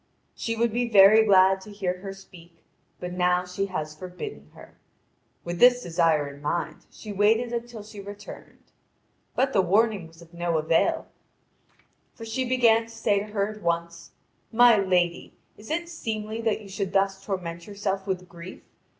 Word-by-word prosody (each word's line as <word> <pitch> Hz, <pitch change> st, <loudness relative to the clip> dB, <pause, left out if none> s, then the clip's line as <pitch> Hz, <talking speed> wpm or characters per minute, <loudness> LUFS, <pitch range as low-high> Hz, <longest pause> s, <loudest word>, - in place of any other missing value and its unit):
She 230 Hz, -, -3 dB
would 230 Hz, -1 st, 0 dB
be 240 Hz, 0 st, 0 dB
very 210 Hz, +1 st, +7 dB
glad 190 Hz, -1 st, +5 dB
to 210 Hz, -, -11 dB
hear 185 Hz, -3 st, -3 dB
her 195 Hz, +1 st, -7 dB
speak, 175 Hz, -3 st, -15 dB, 0.4 s
but 180 Hz, 0 st, -5 dB
now 180 Hz, 0 st, +1 dB
she 180 Hz, +2 st, -3 dB
has 155 Hz, -5 st, -5 dB
forbidden 165 Hz, -, -8 dB
her. -, -, -15 dB, 0.7 s
With 175 Hz, 0 st, -5 dB
this 245 Hz, 0 st, +6 dB
desire 165 Hz, -4 st, +2 dB
in 140 Hz, 0 st, -11 dB
mind, 170 Hz, +4 st, -3 dB
she 215 Hz, -, -10 dB
waited 220 Hz, +4 st, +2 dB
until 235 Hz, -2 st, -5 dB
she 210 Hz, 0 st, -11 dB
returned. 205 Hz, +1 st, -11 dB, 0.7 s
But 265 Hz, +1 st, +1 dB
the 195 Hz, -, +4 dB
warning 200 Hz, 0 st, +1 dB
was 165 Hz, 0 st, -19 dB
of 170 Hz, 0 st, -16 dB
no 170 Hz, -1 st, -1 dB
avail, 160 Hz, +1 st, +1 dB, 1.1 s
for 225 Hz, -, -9 dB
she 225 Hz, +4 st, -2 dB
began 230 Hz, -3 st, +3 dB
to -, -, -16 dB
say 205 Hz, -3 st, 0 dB
to 200 Hz, -, -4 dB
her 205 Hz, -1 st, -1 dB
at 215 Hz, 0 st, -10 dB
once: 170 Hz, 0 st, -3 dB, 0.4 s
"My 240 Hz, 0 st, +7 dB
lady, 180 Hz, -4 st, 0 dB, 0.2 s
is 210 Hz, -, -14 dB
it 340 Hz, +2 st, -2 dB
seemly 225 Hz, -8 st, -4 dB
that 220 Hz, -1 st, 0 dB
you 205 Hz, -, -12 dB
should 195 Hz, 0 st, -4 dB
thus 195 Hz, 0 st, +1 dB
torment 170 Hz, -3 st, -5 dB
yourself 200 Hz, -1 st, -3 dB
with 185 Hz, -1 st, -3 dB
grief? 170 Hz, +1 st, -11 dB
195 Hz, 170 wpm, -26 LUFS, 175-220 Hz, 1.1 s, very